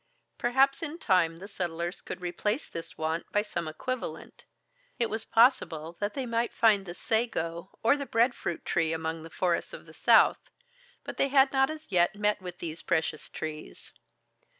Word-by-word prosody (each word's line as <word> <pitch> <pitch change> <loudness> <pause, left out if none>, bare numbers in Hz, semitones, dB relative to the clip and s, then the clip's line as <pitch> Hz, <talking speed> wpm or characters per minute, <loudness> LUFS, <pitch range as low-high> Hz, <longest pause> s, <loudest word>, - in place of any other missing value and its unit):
Perhaps 270 +3 +3
in 325 0 -4
time 180 - +2
the 190 +4 -9
settlers 175 -2 -4
could 185 - -7
replace 210 - -2
this 165 - -7
want 160 +1 -2
by 205 - +2
some 175 -6 -4
equivalent, 255 +11 -5 0.5
it 235 -2 0
was 220 +1 -3
possible 175 - +3
that 205 0 -2
they 270 -2 -2
might 230 0 0
find 205 -4 +4
the 175 - -6
sago 180 -7 -1
or 230 +5 +5
the 280 -1 -5
breadfruit 230 -7 0
tree 165 -1 +1
among 160 0 -3
the 165 - -9
forests 175 0 0
of - - -9
the - - -14
south, - - +4 0.5
but - - -7
they - - +3
had 270 0 +5
not 270 0 +4
as 310 0 -7
yet 175 +2 +3
met 210 -1 +1
with 180 -1 -7
these 165 -2 -6
precious 160 -1 -1
trees. 155 - -7
195 Hz, 175 wpm, -29 LUFS, 165-240 Hz, 0.5 s, or